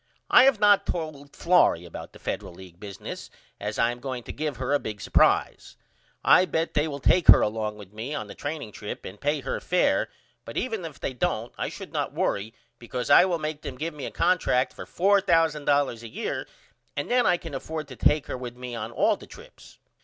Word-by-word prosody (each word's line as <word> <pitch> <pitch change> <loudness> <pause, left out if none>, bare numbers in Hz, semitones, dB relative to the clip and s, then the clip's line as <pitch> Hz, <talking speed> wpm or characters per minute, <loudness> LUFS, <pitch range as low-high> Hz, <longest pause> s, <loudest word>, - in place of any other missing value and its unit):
I 250 - +8
have 270 -6 +4
not 205 -1 +5
told 150 -4 -5
Florrie 170 - +3
about 85 - -9
the - - -14
Federal - - -5
League 90 -1 -13
business 100 -2 -8 0.3
yet 105 - -5
as 105 - -6
I 115 +1 +3
am 120 - -8
going 125 -1 -5
to - - -7
give 150 -4 -3
her 130 +2 -1
a 145 - +3
big 105 -1 -6
supprise. 95 - +1 0.5
I 185 - +6
bet 165 -2 -1
they 150 +1 +1
will 145 -2 -4
take 170 +5 +2
her - - +10
along 105 0 -1
with 100 -1 -13
me 120 +8 -5
on - - -4
the - - -10
training 145 -7 -5
trip 105 0 -7
and 100 +2 -9
pay 145 0 0
her - - -3
fair 180 0 +1 0.3
but - - -8
even 220 -8 -2
if 155 -4 -9
they 130 - -3
don't 125 - -2
I - - -3
should - - -9
not - - -2
worry 105 +4 -1 0.2
because 125 +1 -4
I - - +8
will 180 -2 0
make 155 -1 -4
them 130 - -7
give 160 +3 -3
me 145 -2 -6
a - - -4
contract 165 -7 +1
for - - -9
$4000 160 - +2
a 115 - -8
year 110 - -4 0.5
and 145 - -2
then 245 0 +4
I 180 -1 +4
can 165 -3 -9
afford 155 +2 -5
to 130 - -9
take 150 +3 +2
her 130 - -5
with 125 -1 -7
me 125 -1 -7
on 115 -1 -4
all 120 - +2
the - - -13
trips. - - -15
140 Hz, 220 wpm, -26 LUFS, 115-165 Hz, 0.5 s, her